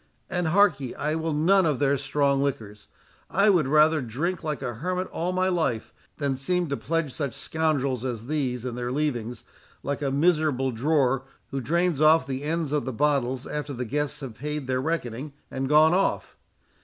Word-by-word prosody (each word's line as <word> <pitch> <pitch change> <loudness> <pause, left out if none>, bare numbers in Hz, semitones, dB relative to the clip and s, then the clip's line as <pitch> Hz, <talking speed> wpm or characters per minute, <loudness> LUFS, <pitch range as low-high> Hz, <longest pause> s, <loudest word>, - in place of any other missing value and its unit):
And, 180 -2 0
hark 195 -1 +4
ye, 130 -3 -5
I 150 +1 -1
will 160 0 -1
none 170 +5 +4
of 150 -4 +1
their 140 0 +2
strong 140 0 +1
liquors. 110 -7 -4 0.4
I 200 +3 +4
would 170 -8 +2
rather 155 +2 +4
drink 150 +11 -3
like 155 -2 -3
a 120 - -3
hermit 180 +9 -2
all 175 +2 -2
my 185 0 +1
life, 160 -11 -1 0.2
than 140 -3 -1
seem 175 +4 -1
to 140 - 0
pledge 165 -4 -2
such 140 -6 -3
scoundrels 140 -6 -1
as 120 -4 -4
these 130 -4 -2
in 125 - -3
their 120 0 -3
leavings, 125 -5 -2 0.4
like 140 +1 -3
a 140 - 0
miserable 145 -3 +2
drawer, 135 +1 +1 0.3
who 135 -1 -2
drains 170 +2 +1
off 155 -1 +6
the 135 0 -4
ends 155 0 -2
of 150 -1 0
the 130 - -2
bottles 130 -1 0
after 150 -1 -4
the 125 -1 -4
guests 145 +5 -2
have 130 -4 -6
paid 150 +3 -4
their 130 0 0
reckoning, 140 -3 -3 0.2
and 135 0 -2
gone 155 +2 +6
off. 190 +2 0
145 Hz, 190 wpm, -26 LUFS, 130-160 Hz, 0.4 s, off